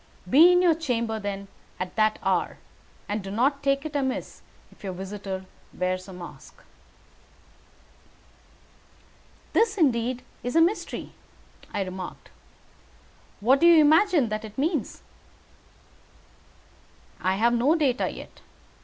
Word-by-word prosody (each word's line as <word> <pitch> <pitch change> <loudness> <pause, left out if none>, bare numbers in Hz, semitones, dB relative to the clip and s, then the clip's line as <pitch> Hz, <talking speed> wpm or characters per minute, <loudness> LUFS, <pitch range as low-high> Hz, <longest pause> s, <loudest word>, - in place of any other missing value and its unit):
Be 315 - +7
in 360 0 +4
your 345 -2 +5
chamber, 235 -8 -2
then, 200 -1 -5 0.3
at 185 0 -5
that 215 -1 +2
hour, - - 0 0.5
and 205 0 -3
do 195 - -7
not 265 +7 +1
take 275 +1 0
it 310 -1 -6
amiss 265 -2 -3 0.3
if - - -21
your 190 -2 -4
visitor 190 0 -6 0.3
wears 185 +1 -2
a - - -9
mask." 180 -1 -12 2.9
"This 450 -2 +3
is - - -13
indeed 250 -6 +1 0.2
a 250 +7 +1
mystery," 345 +6 0 0.6
I 200 - -1
remarked. 185 -1 -8 1.1
"What 260 +6 +4
do 340 - +5
you 340 -2 +8
imagine 310 - +4
that 215 +1 -3
it 215 -1 -10
means?" 295 - -2 2.2
"I 185 +3 +1
have 235 +4 +2
no 255 +7 +3
data 275 -6 +1
yet. - - -11
240 Hz, 125 wpm, -26 LUFS, 200-305 Hz, 2.9 s, you